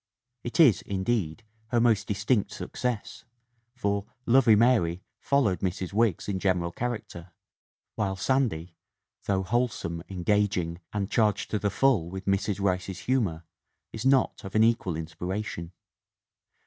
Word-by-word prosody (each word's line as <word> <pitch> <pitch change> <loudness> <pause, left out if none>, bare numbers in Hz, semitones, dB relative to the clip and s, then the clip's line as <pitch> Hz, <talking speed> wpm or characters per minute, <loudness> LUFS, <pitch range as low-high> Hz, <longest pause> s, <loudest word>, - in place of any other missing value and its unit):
"It 120 - -4
is, 130 - +6
indeed, 100 -1 -2 0.2
her 120 +1 +1
most 115 -3 +3
distinct 105 +1 +1
success, 115 +2 -4 0.5
for 100 -4 -1 0.2
Lovey 120 -3 +6
'Mary 105 -7 +3 0.2
followed 130 -10 +1
Mrs. 95 0 -3
Wiggs 110 -4 +1
in 100 -2 -1
general 90 -3 0
character, 105 -7 -5 0.6
while 100 -2 -1
Sandy, 95 -8 0 0.5
though 95 -1 +1
wholesome, 100 -6 -1
engaging, 95 -2 0
and 100 -1 -3
charged 105 -3 +1
to 105 - 0
the 100 +1 0
full 100 -6 +2
with 95 +1 -7
Mrs. 100 +1 0
Rice's 95 0 -1
humor, 105 -11 0 0.5
is 110 - -5
not 135 -1 +2
of 95 - -8
an 110 - +5
equal 115 -7 +2
inspiration. 85 +2 -5
100 Hz, 130 wpm, -27 LUFS, 90-115 Hz, 0.6 s, is